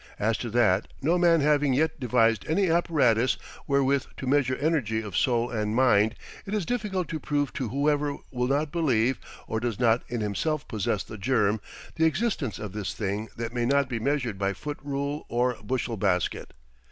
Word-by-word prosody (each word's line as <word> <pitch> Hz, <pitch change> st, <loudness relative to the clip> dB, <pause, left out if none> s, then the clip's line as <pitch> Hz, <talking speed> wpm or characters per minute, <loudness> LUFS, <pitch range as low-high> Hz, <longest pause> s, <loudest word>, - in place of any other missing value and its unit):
As 110 Hz, +2 st, +1 dB
to 120 Hz, -, -4 dB
that, 110 Hz, -4 st, +2 dB, 0.2 s
no 170 Hz, +5 st, +3 dB
man 170 Hz, -2 st, +4 dB
having 145 Hz, -2 st, +3 dB
yet 155 Hz, +2 st, +1 dB
devised 115 Hz, -3 st, +2 dB
any 175 Hz, +2 st, +2 dB
apparatus 135 Hz, -8 st, +2 dB, 0.3 s
wherewith 140 Hz, 0 st, +2 dB
to -, -, -5 dB
measure 130 Hz, -1 st, +2 dB
energy 140 Hz, -8 st, 0 dB
of 105 Hz, -5 st, -6 dB
soul 120 Hz, -1 st, +1 dB
and 105 Hz, -2 st, -1 dB
mind, 110 Hz, -3 st, +4 dB, 0.3 s
it 205 Hz, -, -2 dB
is 205 Hz, -5 st, -1 dB
difficult 205 Hz, -7 st, -2 dB
to 160 Hz, -, -3 dB
prove 145 Hz, -1 st, -1 dB
to 130 Hz, -4 st, -3 dB
whoever 145 Hz, +2 st, 0 dB
will 125 Hz, -1 st, -1 dB
not 145 Hz, +2 st, 0 dB
believe, 130 Hz, -7 st, +1 dB, 0.3 s
or 110 Hz, -, -2 dB
does 120 Hz, -2 st, -3 dB
not 120 Hz, -1 st, +3 dB
in 120 Hz, -1 st, -3 dB
himself 145 Hz, +9 st, -1 dB
possess 105 Hz, -3 st, -1 dB
the 110 Hz, -, -10 dB
germ, 105 Hz, -2 st, +1 dB, 0.4 s
the 160 Hz, -, +3 dB
existence 160 Hz, -, 0 dB
of 105 Hz, -3 st, -6 dB
this 105 Hz, -2 st, -4 dB
thing 105 Hz, +1 st, -2 dB
that 115 Hz, 0 st, -4 dB
may 120 Hz, -1 st, 0 dB
not 140 Hz, +1 st, +3 dB
be 120 Hz, -3 st, -3 dB
measured 125 Hz, -5 st, -1 dB
by 100 Hz, 0 st, 0 dB
foot 145 Hz, +9 st, -6 dB
rule 140 Hz, +1 st, -3 dB
or 125 Hz, +1 st, +1 dB
bushel 120 Hz, 0 st, -2 dB
basket. 90 Hz, -9 st, -1 dB
125 Hz, 185 wpm, -27 LUFS, 110-145 Hz, 0.4 s, man